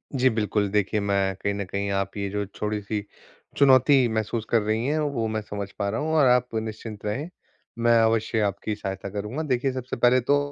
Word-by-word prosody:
जी 130 Hz, 0 st, +4 dB
बिल्कुल, 105 Hz, -2 st, 0 dB
देखिए, 105 Hz, +1 st, +1 dB
मैं 100 Hz, -1 st, 0 dB
कहीं 100 Hz, +2 st, -2 dB
न 100 Hz, 0 st, -3 dB
कहीं 100 Hz, +2 st, -3 dB
आप 100 Hz, +1 st, -3 dB
ये 100 Hz, -1 st, -2 dB
जो 105 Hz, +1 st, -2 dB
छोटी-सी 105 Hz, +1 st, -3 dB, 0.5 s
चुनौती 135 Hz, -1 st, +5 dB
महसूस 110 Hz, 0 st, -2 dB
कर 115 Hz, -, +3 dB
रही 110 Hz, +2 st, -1 dB
हैं, 155 Hz, +2 st, +1 dB
वो 140 Hz, -7 st, -1 dB
मैं 110 Hz, 0 st, -2 dB
समझ 100 Hz, -1 st, -6 dB
पा 100 Hz, -, 0 dB
रहा 110 Hz, -, -2 dB
हूँ 160 Hz, +1 st, -1 dB
और 150 Hz, -3 st, +5 dB
आप 125 Hz, 0 st, +4 dB
निश्चिंत 110 Hz, -1 st, -5 dB
रहें। 125 Hz, +11 st, -3 dB, 0.5 s
मैं 120 Hz, 0 st, +4 dB
अवश्य 110 Hz, 0 st, +1 dB
आपकी 100 Hz, +2 st, -3 dB
सहायता 100 Hz, -1 st, -5 dB
करूँगा। 105 Hz, +9 st, -4 dB
देखिए, 135 Hz, -2 st, 0 dB
सबसे 130 Hz, -1 st, -4 dB
पहले 125 Hz, +2 st, +4 dB
तो 145 Hz, +3 st, +1 dB
110 Hz, 200 wpm, -25 LUFS, 100-125 Hz, 0.5 s, चुनौती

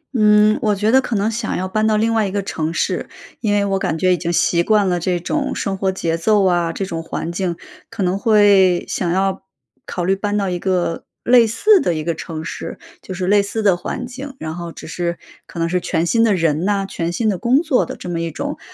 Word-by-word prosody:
嗯， 210 Hz, -1 st, +4 dB
我 210 Hz, -2 st, +2 dB
觉 210 Hz, +3 st, +1 dB
得 265 Hz, -, +5 dB
可 245 Hz, -3 st, -3 dB
能 210 Hz, +2 st, +1 dB
想 225 Hz, 0 st, -3 dB
要 185 Hz, +1 st, -2 dB
搬 215 Hz, +3 st, 0 dB
到 215 Hz, -1 st, +2 dB
另 225 Hz, +1 st, +1 dB
外 220 Hz, -2 st, +2 dB
一 190 Hz, -, -5 dB
个 200 Hz, -1 st, -2 dB
城 160 Hz, -4 st, -3 dB
市。 165 Hz, -, -2 dB, 0.3 s
因 215 Hz, -, 0 dB
为 205 Hz, 0 st, +2 dB
我 195 Hz, -1 st, 0 dB
感 160 Hz, -2 st, -1 dB
觉 185 Hz, +2 st, +3 dB
已 180 Hz, -, 0 dB
经 170 Hz, 0 st, -2 dB
习 170 Hz, 0 st, +2 dB
惯 210 Hz, +1 st, +2 dB
了 175 Hz, -1 st, 0 dB
这 175 Hz, +1 st, -1 dB
种 275 Hz, -, -2 dB
生 195 Hz, -, -2 dB
活 190 Hz, 0 st, 0 dB
节 165 Hz, -3 st, -2 dB
奏 205 Hz, +2 st, +3 dB
啊， 175 Hz, -2 st, +2 dB
这 190 Hz, +4 st, -3 dB
种 165 Hz, -3 st, -4 dB
环 165 Hz, +1 st, -4 dB
境 175 Hz, -1 st, -2 dB, 0.3 s
可 200 Hz, -, -4 dB
能 185 Hz, +2 st, 0 dB
会 200 Hz, -4 st, +4 dB
想 175 Hz, -2 st, -2 dB
要 195 Hz, +1 st, 0 dB, 0.5 s
考 175 Hz, -, -3 dB
虑 190 Hz, +2 st, +2 dB
搬 205 Hz, +1 st, -2 dB
到 200 Hz, -2 st, 0 dB
一 175 Hz, -, -2 dB
个 180 Hz, -3 st, -1 dB, 0.2 s
类 240 Hz, -2 st, +5 dB
似 395 Hz, -, +4 dB
的 175 Hz, -, 0 dB
一 155 Hz, -, -3 dB
个 170 Hz, -, -1 dB
城 160 Hz, 0 st, -7 dB
市， -, -, -6 dB, 0.2 s
就 185 Hz, -, -7 dB
是 185 Hz, 0 st, -3 dB
类 205 Hz, +2 st, +4 dB
似 215 Hz, +2 st, -3 dB
的 195 Hz, -3 st, +4 dB
环 240 Hz, +7 st, -5 dB
境， 265 Hz, +2 st, -8 dB
然 155 Hz, 0 st, -5 dB
后 170 Hz, -1 st, -6 dB
只 -, -, -11 dB
是 170 Hz, +1 st, -3 dB, 0.3 s
可 -, -, -12 dB
能 165 Hz, 0 st, 0 dB
是 180 Hz, +1 st, 0 dB
全 165 Hz, -1 st, -1 dB
新 230 Hz, +5 st, +2 dB
的 210 Hz, -4 st, +3 dB
人 160 Hz, -2 st, +1 dB
呐， 200 Hz, 0 st, 0 dB
全 170 Hz, -2 st, -3 dB
新 220 Hz, +5 st, -1 dB
的 195 Hz, -4 st, 0 dB
工 260 Hz, -, +2 dB
作 305 Hz, -7 st, +2 dB
的 -, -, -6 dB
这 -, -, -9 dB
么 170 Hz, -1 st, -2 dB
一 165 Hz, -, -2 dB
种 -, -, -5 dB
195 Hz, 270 characters per minute, -19 LUFS, 175-215 Hz, 0.5 s, 得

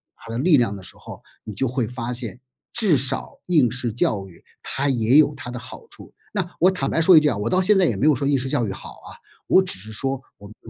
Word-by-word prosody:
他 115 Hz, -, -12 dB
的 115 Hz, -, -4 dB
力 150 Hz, +2 st, +4 dB
量 115 Hz, -5 st, 0 dB
的 95 Hz, -, -11 dB
时 -, -, -11 dB
候， -, -, -12 dB, 0.2 s
你 105 Hz, -, -7 dB
就 130 Hz, +7 st, -1 dB
会 125 Hz, -2 st, -2 dB
发 125 Hz, 0 st, -5 dB
现 120 Hz, -2 st, -1 dB, 0.3 s
至 210 Hz, -10 st, +3 dB
少 130 Hz, +1 st, 0 dB
应 150 Hz, -9 st, +3 dB
试 125 Hz, -2 st, -2 dB
教 105 Hz, -3 st, -1 dB
育 85 Hz, -3 st, -18 dB, 0.2 s
它 140 Hz, +1 st, -2 dB
也 120 Hz, +1 st, +3 dB
有 150 Hz, -1 st, +4 dB
它 130 Hz, -3 st, -8 dB
的 125 Hz, -, -6 dB
好 125 Hz, -, -11 dB
处。 -, -, -14 dB, 0.2 s
那 185 Hz, -4 st, -3 dB
我 185 Hz, -, +5 dB
坦 140 Hz, -7 st, -2 dB
白 -, -, 0 dB
说 180 Hz, +2 st, +6 dB
一 -, -, +10 dB
句 150 Hz, -, +1 dB
啊， 120 Hz, -8 st, 0 dB
我 105 Hz, +3 st, -2 dB
到 185 Hz, -, +2 dB
现 205 Hz, +2 st, +4 dB
在 185 Hz, -, +4 dB
也 115 Hz, -, 0 dB
没 135 Hz, -, 0 dB
有 155 Hz, -, +5 dB
说 140 Hz, +3 st, -2 dB
应 140 Hz, -1 st, +2 dB
试 130 Hz, +1 st, -4 dB
教 120 Hz, -, 0 dB
育 95 Hz, -, -4 dB
好 -, -, -8 dB
啊， -, -, -14 dB, 0.3 s
我 190 Hz, -, +5 dB
只 185 Hz, -, -1 dB
是 105 Hz, +3 st, -10 dB
说 135 Hz, +5 st, -2 dB, 0.2 s
我 100 Hz, -, -13 dB
们 110 Hz, -, -15 dB
130 Hz, 295 characters per minute, -22 LUFS, 115-150 Hz, 0.3 s, 一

